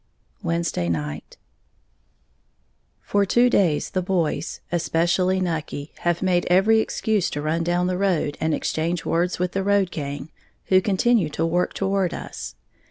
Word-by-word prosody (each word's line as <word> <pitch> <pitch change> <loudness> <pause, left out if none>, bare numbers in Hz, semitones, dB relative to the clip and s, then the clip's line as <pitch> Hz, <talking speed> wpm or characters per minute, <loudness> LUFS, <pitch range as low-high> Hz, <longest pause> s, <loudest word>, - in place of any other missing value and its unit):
Wednesday 170 - -1
Night. 75 -2 -4 1.7
For 205 0 +2
two 240 +5 +3
days 170 -10 +2
the 185 - 0
boys, 180 -3 -1
especially 175 +2 +1
Nucky, 160 -4 -3
have 175 0 0
made 180 -2 +2
every 200 +5 +5
excuse 220 -3 0
to 145 - -4
run 155 +3 0
down 175 +1 +1
the 180 0 -1
road 175 -7 +1
and 160 - +1
exchange 165 +2 -1
words 175 +2 0
with 180 0 -1
the 195 - -1
road 200 -2 +2
gang, 145 0 -5 0.4
who 185 0 +5
continue 200 -1 +2
to 165 +2 -1
work 175 +2 0
toward 195 -2 0
us. - - -7
175 Hz, 145 wpm, -23 LUFS, 160-190 Hz, 1.7 s, every